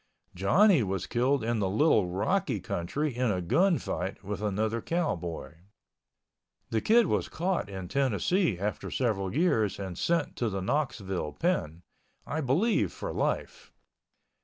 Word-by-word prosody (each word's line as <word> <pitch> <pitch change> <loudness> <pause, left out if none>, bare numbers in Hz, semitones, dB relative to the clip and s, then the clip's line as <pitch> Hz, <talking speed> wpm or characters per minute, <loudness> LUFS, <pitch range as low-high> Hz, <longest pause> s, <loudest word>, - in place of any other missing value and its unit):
Johnny 155 - +4
was 95 -3 -2
killed 130 +2 +1
in 115 0 0
the 95 -2 0
Little 105 - +3
Rocky 95 +3 0
country 135 - -2
in 125 -1 +1
a 95 -3 0
gun 170 - +3
fight 95 +4 -4
with 100 +1 -4
another 110 +2 -1
cowboy. 85 - -3 1.1
The 110 - +1
Kid 235 +1 +5
was - - 0
caught 175 - -1
in 95 -2 -6
Tennessee 135 - +1
after 105 +3 -3
several 105 -6 -1
years 115 - +2
and 95 -3 -5
sent 165 - 0
to 120 - 0
the 95 -2 -3
Knoxville 95 - -2
pen—I 100 - -4
believe 160 - +2
for - - -5
life. - - -2
110 Hz, 135 wpm, -29 LUFS, 95-155 Hz, 1.1 s, Kid